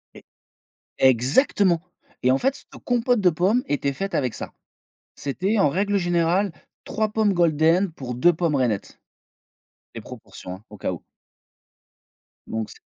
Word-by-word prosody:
E - - -12 0.8
exactement 160 - +3 0.4
et 125 - +3
en 130 - +3
fait, 270 - 0
c - - -16
te - - -12
compote 245 -1 +1
de 185 -3 +5
pommes 190 +9 +2
était 140 -1 -1
faite 195 +7 -4
avec 125 -5 0
ça. - - -7 0.6
C'était 190 +10 -1
en 170 - +4
règle 200 +6 0
générale, 175 +2 +1 0.3
3 215 0 -1
pommes 215 -1 +2
golden 170 +2 +3
pour 130 -5 -6
2 175 +8 +4
pommes 165 -2 0
rainettes. 120 -7 -1 1.0
Les - - -6
proportions 90 - -10
hein, 95 - -16
au 105 - -11
cas 95 - -2
où. 85 - -9 1.4
Donc 110 -1 -3
c - - -14
170 Hz, 155 wpm, -23 LUFS, 135-200 Hz, 1.4 s, de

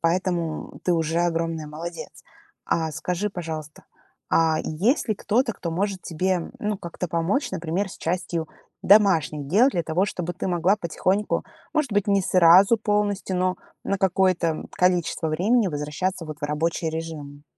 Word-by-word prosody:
Поэтому 170 -1 -1
ты 180 - +2
уже 165 0 +1
огромная 165 -2 -1
молодец. 165 +3 -7 0.6
А 160 -1 0
скажи, 180 +7 -2
пожалуйста, 160 -4 -6 0.5
а 160 -1 +3
есть 210 - 0
ли 215 - +2
кто-то, 230 +4 0
кто 170 - -5
может 190 +2 -2
тебе, 180 +2 -2
м, 175 -2 -4
ну, 210 0 -2
как-то 175 0 -5
помочь, 170 - 0
например, 180 +2 -2
с - - -10
частью 170 -1 -2 0.3
домашних 170 -8 +4
дел 220 - +5
для 175 - -1
того, 165 +4 +1
чтобы 175 -3 -4
ты - - -4
могла 180 +3 +2
потихоньку, 190 +3 -1 0.3
может 305 -5 0
быть 205 0 +1
не 200 -1 +4
сразу 185 +5 +6
полностью, 205 -3 0
но 185 0 +1 0.3
на 195 - 0
какое-то, 185 -2 +2
м, 160 - -4
количество 180 -2 +1
времени 200 +7 +2
возвращаться, 155 +4 -3
вот, 155 -1 -7
в - - -3
рабочий 160 +2 -1
режим? 155 -3 -7
175 Hz, 155 wpm, -24 LUFS, 160-195 Hz, 0.6 s, сразу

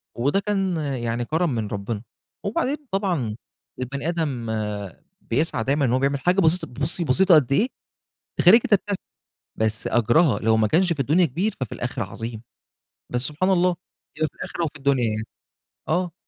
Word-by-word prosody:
وده 140 +11 +1
كان 195 -4 -1
يعني 120 -5 -2
كرم 160 +5 0
من 110 -2 -2
ربنا. 105 +2 -4 0.4
وبعدين 255 +8 -1
طبعًا 175 - -1 0.4
البني 140 +5 -3
آدم 140 -9 -2 0.7
بيسعى 125 -2 0
دايمًا 140 +2 +1
إن 120 - +1
هو 130 - +2
بيعمل 140 0 +1
حاجة 180 +5 +2
بسيطة، 165 0 +2
بُصي، 145 +7 0
بسيطة 175 +6 +5
قد 140 -3 +3
إيه 215 - +3 0.7
تخلّيكِ 225 +8 +6
تبتسمي، 205 -3 +1 0.6
بس 110 0 0
أجرها 120 +2 +3
لو 110 0 +2
ما 110 -1 +3
كانش 175 - +3
في 145 - -11
الدنيا 155 +7 +3
كبير، 180 - -1
ففي 130 - -4
الآخرة - - -3
عظيم. 115 -1 -6 0.7
بس 125 - 0
سبحان 150 +8 +1
الله، 180 -1 +3 0.4
يبقى 155 0 0
في - - -37
الآخرة 170 - -4
وفي 155 -1 -5
الدنيا 135 -3 +1
يعني. 110 0 -1 0.6
آه. 175 +1 0
145 Hz, 160 wpm, -23 LUFS, 120-180 Hz, 0.7 s, تخلّيكِ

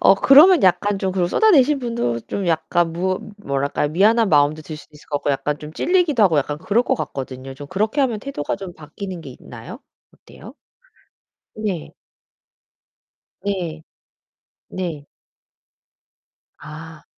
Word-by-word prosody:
어 - - +6
그러면 305 - +7
약간 195 +2 +2
좀 190 -1 -1
그 180 -2 +1
쏟아내신 295 - +4
분도 230 - -2
좀 190 - -4
약간 165 +1 +1
무 185 +2 -1 0.2
뭐랄까요. 140 -3 -1
미안한 210 +7 +3
마음도 150 0 +3
들 155 0 -8
수도 150 - -15
있을 150 - -17
것 145 - -1
같고 145 - -1
약간 145 +1 -1
좀 150 +1 -9
찔리기도 335 - +2
하고 165 -7 +4
약간 145 +1 -2
그럴 205 +8 +1
거 - - +1
같거든요. 135 -3 -6
좀 145 +2 -10
그렇게 215 - -1
하면 235 -6 0
태도가 270 - -4
좀 195 -2 -8
바뀌는 170 +4 -8
게 - - -10
있나요? - - -10 0.3
어때요? - - -15 1.0
네. 200 -7 -4 1.5
네. 175 -6 -3 0.9
네. 165 -6 -5 1.5
아. 155 +1 -11
175 Hz, 270 characters per minute, -21 LUFS, 150-215 Hz, 1.5 s, 그러면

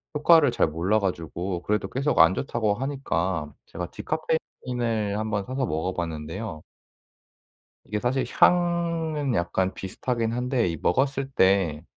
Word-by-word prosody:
효과를 150 -2 +5
잘 120 - +2
몰라 85 +7 +1
가지고 90 -1 -3
그래도 105 -2 -1
계속 140 +3 0
안 95 - +7
좋다고 110 -6 0
하니까 95 - -2
제가 90 +1 -6
디카페인을 120 -9 -2
한번 110 -2 -1
사서 130 +1 -2
먹어 80 0 -2
봤는데요. 80 +2 -5 1.2
이게 105 +1 -3
사실 130 +4 0
향은 170 -5 +2
약간 95 +1 0
비슷하긴 115 +4 -2
한데 125 -2 0
이 85 -2 -2
먹었을 135 - 0
때 95 - +2
110 Hz, 285 characters per minute, -25 LUFS, 90-135 Hz, 1.2 s, 안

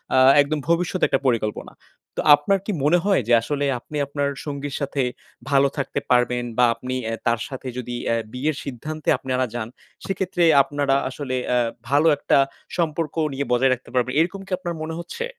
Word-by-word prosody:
আ - - +5 0.2
একদম 150 +2 -1
ভবিষ্যত 175 +2 +1
একটা 135 - +1
পরিকল্পনা। 110 -4 -1 0.4
তো - - -1
আপনার 145 +7 +1
কি - - -1
মনে 155 +5 +4
হয় 200 -7 +3
যে 120 - +3
আসলে 145 +4 -2
আপনি 150 +5 -7
আপনার 140 0 -1 0.2
সঙ্গীর 145 -1 -4
সাথে, 140 -1 -1 0.5
ভালো 140 0 +5
থাকতে 140 - -2
পারবেন? 125 0 +3
বা 125 - +6
আপনি 130 0 -5 0.2
এ - - -2
তার 115 -1 +2
সাথে 130 -1 -7
যদি 120 -1 -4 0.2
এ - - +2 0.2
বিয়ের 140 +4 -1
সিদ্ধান্তে 150 +4 -5
আপনারা 130 -1 -1
যান 110 -2 -3 0.4
সেক্ষেত্রে 190 -1 -1 0.2
আপনারা 145 -1 0
আসলে 130 -1 -4 0.2
এ - - +4 0.3
ভালো 145 +4 +4
একটা - - +2 0.4
সম্পর্ক 160 -2 -1 0.2
নিয়ে 140 +1 -2
বজায় 130 +2 +3
রাখতে 125 0 -8
পারবেন। 125 0 +1
এইরকম 180 +4 0
কি - - -15
আপনার 175 -2 -4
মনে 160 +1 -4
হচ্ছে? 470 - -5
140 Hz, 180 wpm, -23 LUFS, 130-160 Hz, 0.5 s, বা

